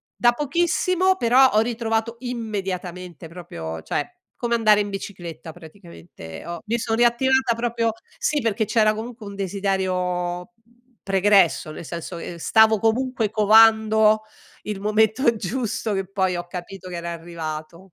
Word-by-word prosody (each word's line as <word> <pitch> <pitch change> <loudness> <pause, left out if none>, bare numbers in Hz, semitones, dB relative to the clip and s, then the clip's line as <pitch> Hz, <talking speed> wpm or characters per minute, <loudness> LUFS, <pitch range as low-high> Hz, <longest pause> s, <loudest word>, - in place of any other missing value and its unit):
da 240 0 +4
pochissimo, 345 +6 +1
però 255 +1 +5
ho 215 - +3
ritrovato 225 0 -1
immediatamente 185 - -5
proprio 80 - -7
cioè, 365 - -3 0.2
come 235 -1 0
andare 215 -2 +4
in 205 - -3
bicicletta 175 -5 -7
praticamente 170 - -12
ho 170 -1 -6
mi 230 +2 0
son 225 0 -1
riattivata 245 +1 +3
proprio 230 -1 -1 0.3
Sì 295 -2 0
perché 220 -1 0
c'era 215 0 +3
comunque 225 -1 -7
un 200 - -8
desiderio 185 -1 -2 0.5
pregresso, 195 -4 +3
nel 160 - -9
senso 170 +1 -6
che, - - -7
ehm, - - -10
stavo 220 +4 +4
comunque 225 0 0
covando 220 0 +5 0.4
il 210 -2 -5
momento 220 +3 +2
giusto, 220 +1 -3
che 195 -1 -2
poi 190 -2 0
ho 175 0 -6
capito 185 +1 -8
che 175 - -6
era 170 0 -5
arrivato. 165 -1 -7
210 Hz, 140 wpm, -23 LUFS, 180-230 Hz, 0.5 s, però